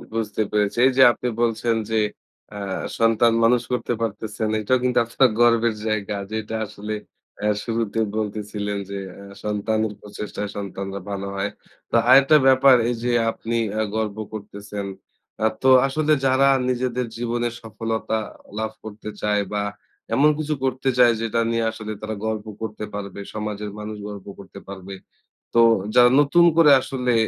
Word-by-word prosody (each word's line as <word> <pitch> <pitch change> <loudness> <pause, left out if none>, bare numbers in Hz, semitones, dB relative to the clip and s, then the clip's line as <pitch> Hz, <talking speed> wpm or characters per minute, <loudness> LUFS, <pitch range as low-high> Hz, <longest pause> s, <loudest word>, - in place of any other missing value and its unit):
বুঝতে 110 -1 -2
পেরেছি। 105 +1 0
এই 135 - +5
যে 130 - +8
আপনি 125 - -4
বলছেন 115 0 +1 0.2
যে 110 - +2 0.6
আ - - -6 0.4
সন্তান 115 0 +4
মানুষ 120 +1 +4
করতে 125 -1 -1
পারতেছেন। 110 0 -3
এটাও 130 +5 +2
কিন্তু 125 -1 +1
আপনার 125 +2 +3
গর্বের 115 -1 +4
জায়গা 105 -1 -1 0.2
যেটা 110 0 -3
আসলে 105 +1 -6 0.5
অ্যা 105 0 +1
শুরুতে 115 -1 -2 0.2
বলতেছিলেন 105 -1 -3
যে 100 - -4 0.2
অ্যা 100 - -11 0.2
সন্তানের 105 +1 -1
প্রচেষ্টায় 105 0 -6
সন্তানরা 100 0 -5
ভালো 100 0 -4
হয়। 100 +1 -1 0.4
তো - - 0
আরেকটা 135 +3 +7
ব্যাপার 130 0 +7
এই 120 - -1
যে 125 - +1 0.2
আপনি 115 +1 -4 0.2
অ্যা 110 - 0
গর্ব 110 -1 -2 0.2
করতেছেন 100 -1 -7 0.5
অ্যা 110 - +3 0.2
তো 130 - +5 0.2
আসলে 155 +2 0
যারা 135 +1 +4 0.2
নিজেদের 125 -1 -1
জীবনে 120 0 -1
সফলতা 110 0 -3 0.4
লাভ 110 0 -2
করতে 110 0 -8
চায় 105 -1 +1
বা 105 0 0 0.5
এমন 150 +3 +5
কিছু 155 0 -1
করতে 130 +1 0
চায় 120 -2 +6
যেটা 115 +1 -1
নিয়ে 115 -1 0
আসলে 110 -1 -7
তারা 110 0 -4
গর্ব 110 -1 -2 0.2
করতে 105 -1 -5
পারবে, 100 -1 -6
সমাজের 105 -1 -4
মানুষ 105 0 -6
গর্ব 100 -2 -8
করতে 100 0 -11
পারবে। 95 0 -8 0.6
তো 115 - +4 0.4
যারা 125 0 +7
নতুন 170 +4 +4
করে 155 -3 +7
আসলে 125 -2 -1
110 Hz, 155 wpm, -23 LUFS, 105-120 Hz, 0.6 s, যে